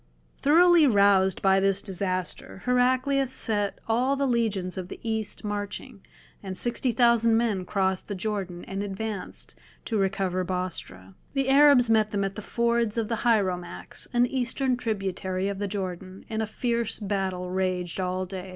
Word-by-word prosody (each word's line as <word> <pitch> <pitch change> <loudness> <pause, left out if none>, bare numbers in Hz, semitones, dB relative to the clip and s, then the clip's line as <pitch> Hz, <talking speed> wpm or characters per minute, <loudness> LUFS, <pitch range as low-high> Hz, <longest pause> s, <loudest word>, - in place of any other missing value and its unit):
Thoroughly 335 +2 +6
roused 200 -4 +4
by 195 0 +5
this 195 0 +2
disaster 185 -1 -3
Heraclius 255 +2 +2
set 205 -5 -1
all 250 +5 +2
the 280 0 0
legions 215 -7 0
of 185 -1 -5
the - - -9
East 220 -2 -2
marching, 205 +2 -5 0.4
and 190 -2 -6
sixty 240 +3 0
thousand 230 -1 +4
men 215 -6 0
crossed 190 -1 -1
the 205 - -4
Jordan 190 -3 -4
and 195 +1 -4
advanced 205 0 -5 0.3
to 220 -3 -1
recover 190 -1 0
Bostra. 175 - -5 0.2
The 270 -1 +1
Arabs 275 -3 +6
met 220 -1 +3
them 205 -1 -1
at 195 0 -2
the 215 - -7
fords 235 0 0
of 225 -2 -1
the 230 - 0
Hieromax, 190 -7 -1
an 240 0 +3
Eastern 260 +1 0
tributary 195 -5 -2
of 200 -1 -3
the 205 - -1
Jordan, 185 -1 -5
and 220 0 -1
a 220 - -1
fierce 235 0 -2
battle 190 -3 -2
raged 185 -1 -1
all 185 0 -1
day. 185 0 -7
205 Hz, 160 wpm, -26 LUFS, 190-235 Hz, 0.4 s, Thoroughly